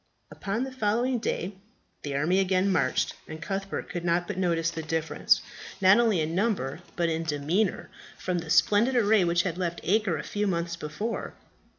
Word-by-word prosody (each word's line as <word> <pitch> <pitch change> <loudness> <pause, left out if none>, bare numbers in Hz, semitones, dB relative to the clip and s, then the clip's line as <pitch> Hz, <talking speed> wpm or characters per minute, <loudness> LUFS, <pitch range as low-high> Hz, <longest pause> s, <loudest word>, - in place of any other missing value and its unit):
Upon 205 +5 -3
the 265 - -5
following 240 +1 0
day 195 -3 -2 0.5
the 145 -1 -4
army 165 +7 +2
again 190 0 +2
marched, - - +1
and 155 - -7
Cuthbert 195 +3 -4
could 175 -1 -5
not 175 0 +1
but - - -4
notice 170 -3 +1
the 160 - -5
difference, 160 0 +1 0.4
not 190 +3 +6
only 220 -8 +3
in 155 +1 -2
number 185 - 0 0.2
but 170 -1 +1
in 165 0 -1
demeanour, 165 +6 0 0.3
from 180 -1 -2
the 165 -1 -8
splendid 205 +9 +4
array 215 -4 +4
which 175 0 +2
had 180 -1 -3
left 170 -2 -2
Acre 200 -3 +1
a 150 - -5
few 210 0 -2
months 170 -2 -1
before. 170 +9 -4
180 Hz, 180 wpm, -27 LUFS, 165-205 Hz, 0.5 s, not